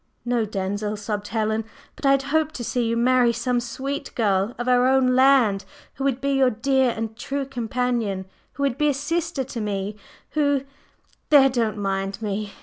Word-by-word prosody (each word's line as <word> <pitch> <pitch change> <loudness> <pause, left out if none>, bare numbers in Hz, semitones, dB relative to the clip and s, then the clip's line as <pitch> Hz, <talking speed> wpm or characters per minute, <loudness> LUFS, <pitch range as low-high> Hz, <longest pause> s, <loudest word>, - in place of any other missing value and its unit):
"No, 240 -2 +1
Denzil," 205 +1 -3
sobbed 210 0 -4
Helen, 220 0 -1 0.3
"but 280 - -2
I - - +6
had 275 0 +1
hoped 315 -1 +1
to 240 - -4
see 240 0 -1
you 230 0 0
marry 245 0 +4
some 240 +1 0
sweet 270 +4 -5
girl 205 -1 +1
of 240 +1 -4
our 250 0 +4
own 260 -1 +3
land 255 -7 +4 0.3
who 270 - -6
would 270 -2 +1
be 280 +1 -1
your 270 -2 +4
dear 260 +3 +2
and 225 -1 -4
true 275 +4 -3
companion, 240 -6 -2 0.3
who 280 - -4
would 275 -2 0
be 300 0 +3
a 285 - +1
sister 320 +1 -2
to 255 -2 -6
me, 205 -1 -3 0.4
who… 285 -3 +1 0.7
there! 275 -3 +7
don't 230 -4 -1
mind 195 0 -2
me! 210 -1 -3
245 Hz, 185 wpm, -23 LUFS, 215-270 Hz, 0.7 s, there